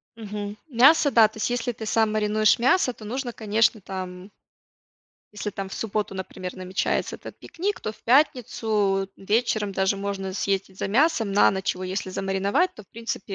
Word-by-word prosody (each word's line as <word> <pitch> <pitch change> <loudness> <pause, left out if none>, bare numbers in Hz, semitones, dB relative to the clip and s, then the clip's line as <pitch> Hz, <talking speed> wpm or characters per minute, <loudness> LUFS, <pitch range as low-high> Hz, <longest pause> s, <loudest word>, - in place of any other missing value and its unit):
Мгм. 210 -1 -6
Мясо, 280 +4 +5
да, 225 -4 +7
то 220 - -15
есть 215 - -1
если 245 0 -1
ты 220 -1 -8
сам 220 0 +2
маринуешь 215 +1 +3
мясо, 260 +1 +3
то 215 - -12
нужно, 245 +1 -4
конечно, 220 0 +1
там 185 0 -7 1.0
Если 210 0 -4
там 195 -1 -5
в - - -7
субботу, 210 -2 -2
например, 185 -1 -6
намечается 185 0 -1
этот - - -11
пикник, 390 +4 -4
то 215 - -4
в - - -23
пятницу, 220 -7 +2
вечером 215 0 0
даже 190 +1 +1
можно 195 -1 -4
съездить 195 0 -2
за - - -2
мясом 235 -2 +2
на 205 - +5
ночь, 190 -1 -1
его 185 - -6
если 185 0 -3
замариновать, 195 - 0
то - - -11
в 195 - -27
принципе 230 -3 -5
210 Hz, 175 wpm, -25 LUFS, 195-230 Hz, 1.0 s, да